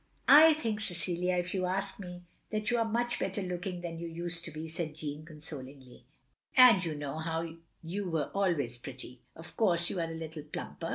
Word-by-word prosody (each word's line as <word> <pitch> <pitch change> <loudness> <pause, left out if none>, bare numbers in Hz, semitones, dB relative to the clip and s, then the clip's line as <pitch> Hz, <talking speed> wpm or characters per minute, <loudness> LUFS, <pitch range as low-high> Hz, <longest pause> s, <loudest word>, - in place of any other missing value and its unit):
" - - -36 0.2
I 320 -1 +7
think, 225 -8 -2
Cecilia, 180 -1 -1
if 175 +1 -1
you 185 -2 0
ask 195 +2 -2
me, 180 -2 -8 0.3
that 215 +2 -1
you 240 - +3
are 230 - +3
much 240 +1 0
better 195 +1 -1
looking 180 0 -3
than 165 -1 -5
you 170 - -4
used 170 +1 -3
to - - -5
be," 155 +2 -6
said 160 -2 -4
Jeanne, 150 -1 -5
consolingly, 135 -5 -10 0.5
"and 245 -7 +9
you 160 -3 -2
know 145 +1 -4 0.6
you 185 +3 -3
were 160 -4 -1
always 165 -12 0
pretty. 125 0 -8
Of 165 +1 -11
course 175 -6 +3
you 185 - -2
are 165 - -2
a 165 - -5
little 160 -1 -6
plumper. 155 +2 -6
170 Hz, 195 wpm, -31 LUFS, 155-190 Hz, 0.6 s, and